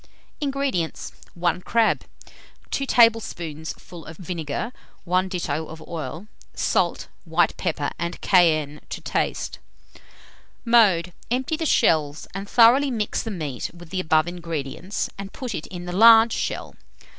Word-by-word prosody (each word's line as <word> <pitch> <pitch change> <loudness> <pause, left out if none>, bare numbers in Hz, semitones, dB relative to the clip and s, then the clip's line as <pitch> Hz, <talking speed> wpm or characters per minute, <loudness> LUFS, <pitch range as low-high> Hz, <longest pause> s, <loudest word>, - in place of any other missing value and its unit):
INGREDIENTS. 275 - -2 0.2
1 175 0 0
crab, 230 +3 +1 0.7
2 275 - -1
tablespoonfuls 175 - +1
of 165 - -10
vinegar, 180 - -4 0.3
1 185 +1 +1
ditto 160 -4 -2
of 160 - -10
oil; 165 +2 -6 0.3
salt, - - 0 0.2
white - - +1
pepper, - - -2
and 170 0 -3
cayenne, 155 -5 +3
to - - -5
taste. - - -2 1.1
Mode. 195 -7 +4 0.2
Empty 260 +6 0
the 320 0 -2
shells, 155 - +2
and 195 +1 -6
thoroughly 245 +4 +6
mix 220 -5 -1
the 225 - -5
meat 155 - -4
with 170 -1 -13
the 190 - -1
above 155 -2 +2
ingredients, 170 +1 -4
and 195 0 -7
put 250 -4 -5
it 160 - -5
in 175 -1 -8
the 175 - -5
large 225 +3 +7
shell. - - -3
180 Hz, 135 wpm, -24 LUFS, 160-225 Hz, 1.1 s, large